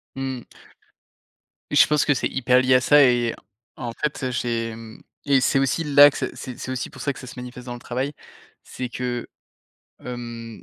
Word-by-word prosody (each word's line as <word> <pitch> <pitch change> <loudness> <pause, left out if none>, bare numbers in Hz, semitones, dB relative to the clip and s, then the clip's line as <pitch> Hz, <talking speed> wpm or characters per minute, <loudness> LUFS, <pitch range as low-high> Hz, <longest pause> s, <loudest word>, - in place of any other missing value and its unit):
Mmh. 130 -2 -4 1.3
Je - - +6
pense 150 -1 +2
que 145 - +4
c'est 130 - -1
hyper 125 -1 +2
lié 130 0 +4
à 125 - +4
ça 145 +3 +6
et 120 -3 +3 0.4
en 120 -2 -4
fait, 150 +2 -3
heu, 130 - -1
j'ai, 115 -2 -2
mmh 115 -1 -12 0.2
et 140 -2 +4
c'est 130 - +2
aussi 135 +4 +1
là 145 0 +8
que - - -7
c'est - - -4
c'est 125 -3 -8
c'est - - -6
aussi 130 -1 -3
pour - - -12
ça 140 - -1
que - - -12
ça 130 - -10
se 125 - -9
manifeste 125 0 -9
dans 120 - -4
le 120 - -8
travail, 130 +4 -3 0.5
c'est 125 -1 -6
que, 120 0 -4 0.8
hem, 115 -2 -7
125 Hz, 205 wpm, -23 LUFS, 120-135 Hz, 1.3 s, là